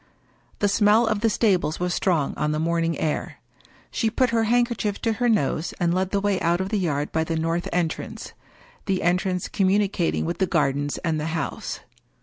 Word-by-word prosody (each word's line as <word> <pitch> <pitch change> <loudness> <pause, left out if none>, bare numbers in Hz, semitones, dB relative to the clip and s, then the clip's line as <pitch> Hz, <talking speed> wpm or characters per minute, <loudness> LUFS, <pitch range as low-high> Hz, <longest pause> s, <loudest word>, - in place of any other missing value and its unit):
The 205 - +2
smell 210 +3 +4
of 220 -2 0
the 225 +1 +2
stables 190 -7 +1
was 180 0 -1
strong 165 -8 +1
on 150 0 -1
the 150 - -1
morning 165 0 0
air. 155 - -2 0.6
She 225 - 0
put 250 +2 +1
her 225 -1 +2
handkerchief 235 -3 +1
to 225 - +2
her 240 +2 0
nose 170 -6 0
and 170 -1 +2
led 185 +1 0
the 200 - 0
way 200 -1 0
out 170 +1 +2
of 190 0 -2
the 210 - 0
yard 150 -5 -1
by 160 - +1
the 165 0 -2
north 165 +2 -1
entrance 170 -2 -3 0.3
— - - -27
the 190 -2 0
entrance 180 +1 0
communi 195 +1 +2
cating 175 -5 0
with 170 +1 -3
the 190 - +2
gardens 145 -4 0
and 160 -2 0
the 150 - -2
house. - - -4
180 Hz, 200 wpm, -24 LUFS, 165-210 Hz, 0.6 s, smell